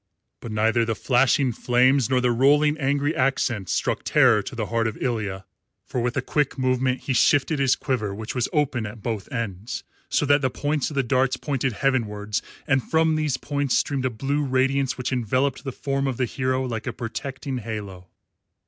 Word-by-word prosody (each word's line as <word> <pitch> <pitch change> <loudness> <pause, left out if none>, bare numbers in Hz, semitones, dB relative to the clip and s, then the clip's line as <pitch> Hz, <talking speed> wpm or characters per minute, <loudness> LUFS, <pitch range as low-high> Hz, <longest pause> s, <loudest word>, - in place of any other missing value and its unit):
But 115 - -7
neither 110 +2 +2
the 115 -1 -1
flashing 130 +2 +2
flames 125 +2 +3
nor 130 -1 +3
the 125 -1 +2
rolling 145 +5 +4
angry 145 +2 0
accents 125 -7 0
struck - - 0
terror 125 -7 +4
to 125 - -8
the 115 -2 -2
heart 115 +1 0
of 110 - -4
Ilya, 105 -6 -2 0.4
for 125 - -3
with 125 +1 -1
a 130 - 0
quick 145 +1 0
movement 130 0 +1
he 135 - -2
shifted 145 +4 +3
his 135 -2 +3
quiver, 110 -6 -2
which 110 +1 -5
was 125 -2 0
open 130 -7 0
at 105 0 -10
both 110 0 -4
ends, 115 -2 -4 0.3
so - - +1
that 145 0 +4
the 130 - +1
points 145 +2 -1
of 150 - -8
the 135 - +2
darts 130 +1 +1
pointed 135 -3 -1
heavenwards, 105 -6 -1 0.2
and 135 -3 +2
from 160 +4 +2
these 150 -4 0
points 140 -2 0
streamed 135 -3 -1
a - - +2
blue 135 +5 -1
radiance 135 0 +1
which 125 0 -3
enveloped 130 +3 0
the 135 - -4
form 135 +1 -2
of 130 -3 -2
the 130 - +1
hero 130 +1 -1
like 115 -2 -4
a 120 - -2
protecting 130 +3 -5
halo. 100 -5 -7
130 Hz, 195 wpm, -24 LUFS, 115-135 Hz, 0.4 s, rolling